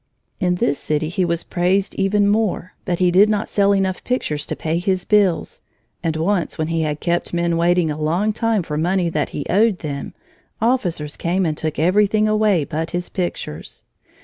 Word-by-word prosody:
In 180 -2 +1
this 145 -5 0
city 155 +1 -1
he 180 +2 0
was 170 -1 -1
praised 185 +2 0
even 200 +1 +2
more, 205 -4 0
but 175 - -1
he 180 0 +3
did 200 +4 +5
not 215 0 -1
sell 200 -1 +3
enough 190 -2 0
pictures 150 - -2
to - - -3
pay 160 +1 -1
his 185 0 -1
bills, 200 -5 +1 0.4
and 160 -1 -1
once, 175 +2 0
when 155 0 -2
he 165 -1 0
had 150 -1 -2
kept 175 0 -1
men 170 0 +1
waiting 170 -1 +2
a 150 +1 -5
long 180 +8 +1
time 225 -3 0
for 150 -2 -4
money 175 +1 +1
that 155 -3 -1
he 145 - -5
owed 210 +1 +3
them, 140 -4 -6 0.4
officers 180 - 0
came 180 +2 0
and 155 -2 0
took 155 0 -3
everything 205 +6 +3
away 215 -6 +2
but 160 +3 -3
his 175 0 -3
pictures. 175 - -5
175 Hz, 190 wpm, -20 LUFS, 160-200 Hz, 0.4 s, did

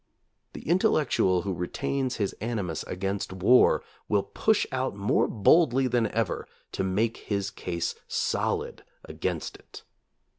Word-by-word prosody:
The - - -9
intellectual 145 - +2
who 100 - -2
re 90 0 -3
tains 135 -2 -2
his 100 -3 -1
animus 105 -8 -2
against 95 +2 -3
war 95 +7 +4 0.3
will 105 -2 +2
push 220 -1 +1
out 130 -4 -1
more 100 +1 +2
boldly 130 - +4
than 120 -3 +2
ever 115 -3 -2 0.2
to - - -2
make 105 +5 0
his 100 -1 -3
case 85 -3 -3
solid - - -1 0.2
against - - -3
it. - - -14
105 Hz, 135 wpm, -27 LUFS, 95-125 Hz, 0.3 s, war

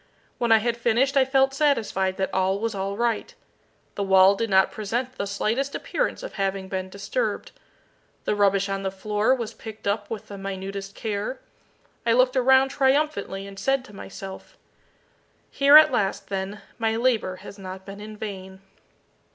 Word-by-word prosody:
When 235 -1 +1
I 225 - +8
had 230 +2 -1
finished 240 +4 +2
I 270 -1 +5
felt 270 0 +3
satisfied 220 -10 +1
that 190 - -2
all 190 +1 +1
was 225 +1 -2
all 195 0 -3
right. 235 -1 -1 0.6
The - - -4
wall 190 0 +6
did 225 +3 -2
not 190 -1 +4
present 240 +5 -3
the 200 - -4
slightest 225 +7 -1
appearance - - -2
of - - -7
having 195 -1 -2
been 185 -1 -3
disturbed. 200 - -3 0.7
The - - +1
rubbish 200 -1 +2
on 195 0 -2
the 195 - -1
floor 210 +5 +1
was 235 -4 -5
picked 220 -1 -10
up 205 +1 -1
with 220 -3 -6
the 200 -1 -8
minutest 195 +1 -6
care. 215 +3 -3 0.6
I 230 - +3
looked 255 +2 +3
around 265 +1 +5
triumphantly, 270 -8 0
and 195 -1 -10
said 270 -1 +1
to 210 - -14
myself 195 - -9 0.9
"Here 280 +2 +7
at 310 - +7
last, 195 -4 -1
then, 195 +1 -4 0.2
my 225 -1 +1
labour 230 -6 +1
has 200 +2 -11
not 190 0 -8
been 200 0 -9
in 215 0 -9
vain." 190 -3 -7
210 Hz, 170 wpm, -25 LUFS, 195-250 Hz, 0.9 s, I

